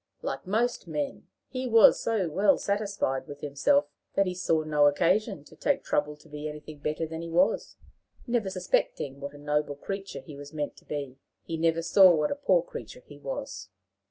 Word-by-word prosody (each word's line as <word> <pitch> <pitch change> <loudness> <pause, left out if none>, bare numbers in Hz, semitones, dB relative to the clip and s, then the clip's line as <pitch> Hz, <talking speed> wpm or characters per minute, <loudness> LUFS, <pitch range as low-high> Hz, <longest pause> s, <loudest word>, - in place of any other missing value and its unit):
Like 135 +5 -4
most 230 +1 0
men, 150 -3 -4 0.2
he 255 -1 -4
was 230 -2 +7
so 220 -6 0
well 195 +6 +3
satisfied 200 -9 -1
with 145 0 -9
himself, 150 - +2 0.3
that 195 - +4
he 185 - -2
saw 165 -3 +1
no 150 -1 +4
occasion 180 +4 +2
to - - -16
take - - 0
trouble 150 0 0
to 150 - -19
be 150 0 -6
anything 150 0 -9
better 155 +3 -2
than 160 +1 -6
he 170 - -6
was. 180 +6 +2 0.5
Never 235 -5 0
suspecting 180 -6 -1
what 140 +1 -7
a - - -10
noble 150 0 -1
creature 195 +6 -6
he 150 - -11
was 145 +2 -10
meant 150 -1 -3
to - - -18
be, 140 -3 -5 0.2
he 165 - -4
never 165 0 +1
saw 180 +1 +7
what 150 -1 +1
a - - 0
poor 485 +12 +3
creature - - -9
he - - -13
was. - - -6
165 Hz, 190 wpm, -28 LUFS, 150-200 Hz, 0.5 s, was